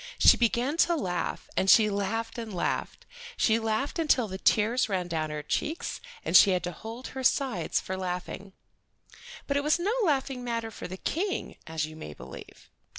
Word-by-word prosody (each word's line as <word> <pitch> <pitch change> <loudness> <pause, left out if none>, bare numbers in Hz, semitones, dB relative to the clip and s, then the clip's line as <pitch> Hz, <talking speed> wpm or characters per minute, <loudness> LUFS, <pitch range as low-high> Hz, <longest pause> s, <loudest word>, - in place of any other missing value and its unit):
She - - +7
began 240 +5 +1
to 340 0 +4
laugh, 180 - -3
and 190 - +2
she 220 +1 +7
laughed 215 +3 -2
and 225 -2 -6
laughed. 180 - -2 0.3
She 225 0 +3
laughed 225 +8 -1
until 275 -7 +3
the 190 -1 -6
tears 225 +5 +2
ran 185 -3 -1
down 160 -2 -2
her 150 0 -5
cheeks 315 - -2 0.2
and - - 0
she 205 - +9
had 180 -2 +1
to 175 - -2
hold 225 +8 -8
her 265 0 -6
sides 250 - +1
for 190 - -5
laughing. 185 +1 -5 0.9
But 280 - 0
it 285 - 0
was 300 +2 +3
no 385 +6 0
laughing 270 -6 0
matter 230 -2 -3
for - - -7
the 185 +1 -7
King, 380 - -2
as 160 -1 -1
you 155 0 -10
may 115 - -8
believe. - - -12
225 Hz, 185 wpm, -28 LUFS, 185-265 Hz, 0.9 s, she